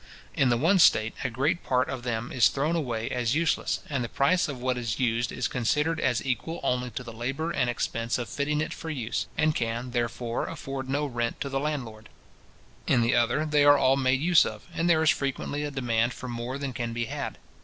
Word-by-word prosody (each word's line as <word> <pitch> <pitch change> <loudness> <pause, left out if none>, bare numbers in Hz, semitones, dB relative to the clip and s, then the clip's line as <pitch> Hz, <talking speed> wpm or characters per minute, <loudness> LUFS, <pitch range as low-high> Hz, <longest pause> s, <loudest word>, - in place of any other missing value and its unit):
In 135 - +2
the 120 - +3
one 175 +9 +3
state, 110 -8 +5
a - - 0
great 140 +9 0
part 125 0 +1
of 130 -2 -4
them 120 -1 -3
is 120 -4 +5
thrown 150 +5 0
away 120 -8 -2
as 125 0 0
useless 165 0 0
and 140 -4 -1
the 120 - -4
price 175 +7 +2
of 140 -4 -5
what 130 0 0
is 115 -2 -3
used 120 -1 +1
is - - -1
considered 150 +5 0
as 120 -1 0
equal 135 +6 -2
only 125 -2 0
to 120 +2 -6
the 115 -1 -9
labour 135 +8 -3
and 125 -6 0
expense 115 0 -1
of 120 - -4
fitting 150 +1 -1
it - - -3
for 165 - -7
use, 125 -7 -2
and 155 0 +3
can, 120 0 -2
therefore, 120 -1 -2
afford 135 -1 -6
no 145 +2 0
rent 120 -4 -2
to 140 - -2
the 135 0 -1
landlord. 125 -7 -4 0.8
In 120 - +4
the 115 +1 +2
other, 120 +6 +2
they 150 -1 +3
are 145 0 +7
all 135 -1 +4
made 130 -1 +2
use 170 +3 +5
of, - - -6
and 165 +1 0
there 160 -2 +4
is 155 - +6
frequently 140 +1 -2
a 145 - -2
demand 120 -3 0
for 130 - -7
more 120 +2 -4
than 140 -2 -4
can 120 -2 -3
be 120 0 -1
had. - - -5
130 Hz, 225 wpm, -27 LUFS, 120-145 Hz, 0.8 s, are